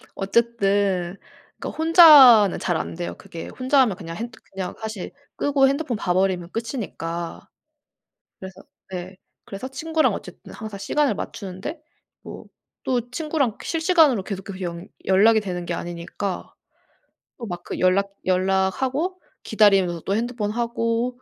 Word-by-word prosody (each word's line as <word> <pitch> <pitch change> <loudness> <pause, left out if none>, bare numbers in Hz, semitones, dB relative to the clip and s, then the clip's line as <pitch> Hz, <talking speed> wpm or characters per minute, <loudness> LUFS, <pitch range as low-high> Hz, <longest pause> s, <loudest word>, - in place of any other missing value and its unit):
어쨌든 200 -4 0 0.4
그러니까 - - -5
혼자는 295 - +8
잘 175 -3 0
안 - - -5
돼요, 175 0 -5
그게. 165 - -9
혼자 260 +2 +1
하면 220 -8 +2
그냥 165 -3 -8
핸뜨 235 +1 -7
그냥 190 -1 -5
사실 220 -4 -6 0.3
끄고 275 -1 +3
핸드폰 275 -3 -1
봐 180 -3 -1
버리면 185 -2 0
끝이니까. 190 -8 -5 0.9
그래서 190 0 -10 0.3
네. 185 +1 -6 0.3
그래서 200 +6 -7
친구랑 315 +4 0
어쨌든 - - -9
항상 215 -2 -7
시간을 285 +8 +1
맞추는데 200 - -6 0.4
뭐 - - -10 0.4
또 245 -2 0
친구랑 290 -4 -1
실시간으로 320 - +3
계속해서 195 -1 -7
연 170 0 -5 0.2
연락이 215 +4 +5
되는 180 -4 -5
게 175 - -3
아니니까 175 +3 -5 0.9
또 235 - -6
막 175 -3 -6
그 - - -6
연락 195 +2 +2 0.2
연락하고 195 - 0 0.2
기다리면서 195 -6 +3
또 195 - 0
핸드폰 230 -2 -2
하고 235 +1 -2
205 Hz, 305 characters per minute, -23 LUFS, 185-255 Hz, 0.9 s, 혼자는